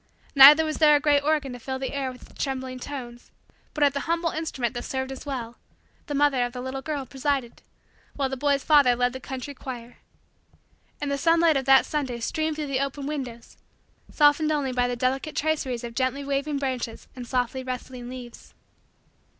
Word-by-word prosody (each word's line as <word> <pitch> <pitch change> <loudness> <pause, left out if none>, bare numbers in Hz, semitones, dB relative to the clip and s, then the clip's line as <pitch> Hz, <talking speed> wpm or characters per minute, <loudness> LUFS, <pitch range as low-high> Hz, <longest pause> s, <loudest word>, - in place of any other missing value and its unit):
Neither 295 +3 +9
was 310 -1 -3
there 300 -2 +7
a - - +4
great 290 -1 +3
organ 295 -3 0
to 245 - -8
fill 260 +3 -4
the 265 +1 -4
air 275 -2 -2
with 250 - -14
its - - -4
trembling 260 -2 -4
tones; 245 -3 -8 0.5
but, 300 - +1
at 285 -1 +4
the 280 - -2
humble 335 0 +1
instrument 270 -7 -3
that 240 -1 -5
served 265 0 -3
as 270 +2 -9
well, 240 -4 -5 0.5
the 290 - -3
mother 280 -3 +3
of 245 0 -3
the 250 - -5
little 260 +1 -5
girl 290 -2 -4
presided, 270 -2 -2 0.5
while 275 -2 0
the 265 - -4
boy's 280 +1 +1
father 285 -5 +5
led 245 0 +1
the 260 - -6
country 265 +2 -6
choir. 245 -3 -8 1.0
And 290 -1 -3
the 280 - -1
sunlight 330 +1 +4
of 270 -1 0
that 270 0 +6
Sunday 265 -6 -3
streamed 310 +6 -1
through 305 0 -3
the 275 -2 -1
open 275 0 -5
windows, 260 -6 -6 0.5
softened 300 +1 +3
only 285 -4 0
by 245 -1 +1
the 245 - -2
delicate 265 +5 -1
traceries 280 -6 -1
of 235 -1 -6
gently 260 +3 -1
waving 280 +1 -1
branches 255 -4 -4
and 250 -2 -8
softly 250 +1 -1
rustling 255 -1 -6
leaves. 250 -2 -10
270 Hz, 195 wpm, -25 LUFS, 250-290 Hz, 1.0 s, Neither